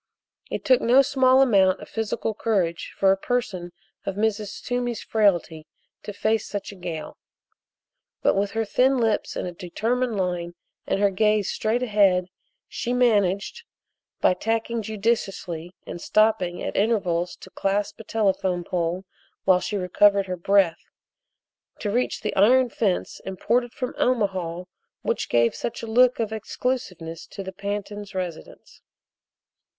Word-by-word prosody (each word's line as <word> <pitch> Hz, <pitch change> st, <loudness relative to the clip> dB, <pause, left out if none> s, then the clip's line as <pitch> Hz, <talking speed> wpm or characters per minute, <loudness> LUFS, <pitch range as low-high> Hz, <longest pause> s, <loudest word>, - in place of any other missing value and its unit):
It -, -, -4 dB
took 255 Hz, -1 st, +5 dB
no 255 Hz, +4 st, +6 dB
small 265 Hz, -1 st, +4 dB
amount 195 Hz, -7 st, +4 dB
of -, -, -10 dB
physical 225 Hz, 0 st, -2 dB
courage 190 Hz, -6 st, -1 dB
for 195 Hz, -1 st, +4 dB
a -, -, +4 dB
person 195 Hz, -6 st, -2 dB, 0.3 s
of 195 Hz, -, -3 dB
Mrs. 210 Hz, -1 st, -1 dB
Toomey's 245 Hz, -2 st, -2 dB
frailty 175 Hz, -7 st, +1 dB, 0.3 s
to -, -, -6 dB
face 215 Hz, +1 st, 0 dB
such 205 Hz, 0 st, -5 dB
a -, -, -11 dB
gale. 170 Hz, -4 st, -6 dB, 1.0 s
But -, -, +4 dB
with 200 Hz, +1 st, -1 dB
her 225 Hz, 0 st, 0 dB
thin 260 Hz, +5 st, +3 dB
lips 225 Hz, -3 st, 0 dB
in -, -, -3 dB
a 180 Hz, -, -4 dB
determined 220 Hz, +7 st, -2 dB
line 175 Hz, -2 st, -2 dB, 0.3 s
and -, -, 0 dB
her 200 Hz, -1 st, +3 dB
gaze 210 Hz, +1 st, +2 dB
straight 230 Hz, +3 st, 0 dB
ahead, 195 Hz, -5 st, +3 dB, 0.4 s
she 245 Hz, -1 st, -3 dB
managed, 215 Hz, -, +1 dB, 0.6 s
by -, -, +5 dB
tacking 225 Hz, +4 st, -1 dB
judiciously 195 Hz, -5 st, -2 dB
and 175 Hz, -, -7 dB
stopping 215 Hz, -5 st, +2 dB
at -, -, -4 dB
intervals 180 Hz, -5 st, +1 dB
to -, -, -14 dB
clasp 205 Hz, +2 st, -1 dB
a -, -, -8 dB
telephone 190 Hz, -5 st, 0 dB
pole 175 Hz, +2 st, -2 dB, 0.4 s
while 185 Hz, -1 st, +5 dB
she 205 Hz, -, -3 dB
recovered 200 Hz, +2 st, +3 dB
her 185 Hz, -1 st, -3 dB
breath, 180 Hz, -1 st, +2 dB, 1.0 s
to 205 Hz, -, -3 dB
reach 245 Hz, +3 st, 0 dB
the 215 Hz, -, -3 dB
iron 250 Hz, +6 st, +5 dB
fence 200 Hz, -6 st, -1 dB
imported 235 Hz, +6 st, 0 dB
from 250 Hz, 0 st, -4 dB
Omaha 190 Hz, -8 st, 0 dB, 0.4 s
which -, -, -1 dB
gave 115 Hz, -1 st, +3 dB
such 235 Hz, -, -5 dB
a -, -, -2 dB
look 245 Hz, +3 st, +4 dB
of 220 Hz, -1 st, -1 dB
exclusiveness 195 Hz, -8 st, -4 dB
to 195 Hz, -, -7 dB
the 190 Hz, 0 st, -7 dB
Pantins' 200 Hz, +1 st, -5 dB
residence. 180 Hz, -3 st, -7 dB
205 Hz, 145 wpm, -24 LUFS, 185-225 Hz, 1.0 s, no